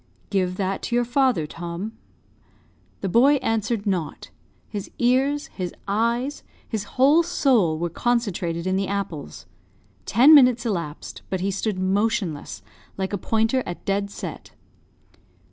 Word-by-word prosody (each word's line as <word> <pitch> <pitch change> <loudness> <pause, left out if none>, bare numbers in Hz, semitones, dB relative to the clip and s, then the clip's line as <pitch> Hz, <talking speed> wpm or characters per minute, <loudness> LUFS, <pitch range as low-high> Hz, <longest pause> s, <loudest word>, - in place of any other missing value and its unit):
"Give 185 -2 0
that 195 0 -1
to 240 - -2
your 240 0 +2
father, 245 - +2
Tom." 170 +6 -6 1.1
The 195 - -1
boy 250 +9 +5
answered 225 -4 -1
not 180 -7 -3 0.4
his 205 -3 -6
ears, 270 +4 +2
his 180 -3 -5
eyes, 235 +7 0 0.3
his 215 -3 -3
whole 285 +6 +6
soul, 255 - +2
were 170 +1 -2
concentrated 185 -7 -1
in 185 0 +1
the 195 0 -1
apples. 185 - -5 0.6
Ten 265 +8 +7
minutes 250 -5 +6
elapsed, 170 -9 -4
but 190 -1 -2
he 195 +2 0
stood 200 +1 -2
motionless, 185 - -1 0.3
like 190 +1 -3
a - - +1
pointer 225 +5 +1
at 175 - -7
dead 200 0 0
set. - - -8
205 Hz, 135 wpm, -23 LUFS, 185-240 Hz, 1.1 s, Ten